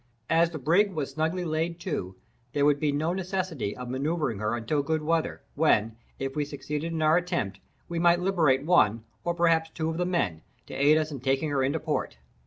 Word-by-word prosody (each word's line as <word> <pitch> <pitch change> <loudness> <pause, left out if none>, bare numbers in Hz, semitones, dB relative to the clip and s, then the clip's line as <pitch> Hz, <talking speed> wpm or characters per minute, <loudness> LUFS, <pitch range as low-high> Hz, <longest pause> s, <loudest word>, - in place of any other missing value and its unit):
As 165 +1 +4
the 165 - -6
brig 175 +8 +3
was 150 -5 -3
snugly 160 +3 -1
laid 165 +1 -1
to, 95 - -3 0.4
there 145 0 +2
would 145 -1 +3
be 150 -1 +1
no 155 +4 0
necessity 185 - -3
of 125 0 -6
manoeuvring 135 -2 -1
her 105 +2 0
until 120 +6 0
good 155 +2 -1
weather, 165 +1 -1
when, 115 -8 +2 0.2
if 135 +1 -4
we 150 - +1
succeeded 150 +3 -4
in 160 -1 -1
our 155 +2 +5
attempt, 170 - -2 0.3
we 170 -1 -3
might 170 0 +4
liberate 160 -8 +2
one, 115 - +4 0.2
or 175 0 -1
perhaps 165 -1 +3
two 160 0 -2
of 160 - -4
the 180 - 0
men, 95 - 0 0.2
to - - -10
aid 145 +3 +4
us 155 0 -1
in 140 - -5
taking 135 +4 0
her 140 -2 +1
into 140 +5 +1
port. 150 - -2
155 Hz, 205 wpm, -27 LUFS, 135-170 Hz, 0.4 s, our